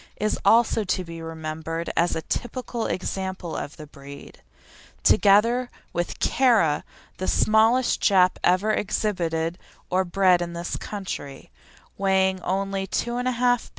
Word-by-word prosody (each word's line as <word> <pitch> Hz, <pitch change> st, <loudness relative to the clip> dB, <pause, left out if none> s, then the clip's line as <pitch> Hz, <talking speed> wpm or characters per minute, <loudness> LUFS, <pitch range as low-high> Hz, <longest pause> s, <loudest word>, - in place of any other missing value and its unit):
is 215 Hz, +1 st, -1 dB
also 225 Hz, -1 st, +4 dB
to 185 Hz, -1 st, -1 dB
be 165 Hz, -1 st, -9 dB
remembered 160 Hz, +1 st, -5 dB
as 170 Hz, +1 st, +2 dB
a 160 Hz, -, -3 dB
typical 240 Hz, +2 st, -3 dB
example 190 Hz, -2 st, -4 dB
of 145 Hz, -, -6 dB
the 155 Hz, -, -9 dB
breed, 140 Hz, -1 st, -13 dB, 0.6 s
together 230 Hz, +5 st, +4 dB, 0.2 s
with 175 Hz, 0 st, -3 dB
Kara, 225 Hz, -, +3 dB, 0.3 s
the 185 Hz, -, -3 dB
smallest 225 Hz, +4 st, +3 dB
Jap 185 Hz, -2 st, +4 dB
ever 185 Hz, +4 st, +3 dB
exhibited 175 Hz, -5 st, -1 dB, 0.3 s
or 185 Hz, +1 st, +2 dB
bred 185 Hz, -1 st, +3 dB
in 170 Hz, 0 st, -4 dB
this 170 Hz, 0 st, -4 dB
country, 185 Hz, -9 st, -7 dB, 0.5 s
weighing 190 Hz, -1 st, +2 dB
only 195 Hz, +1 st, -2 dB
2 235 Hz, +4 st, -2 dB
1/2 250 Hz, +1 st, -1 dB
lb. 245 Hz, 0 st, +1 dB
190 Hz, 130 wpm, -24 LUFS, 170-215 Hz, 0.6 s, also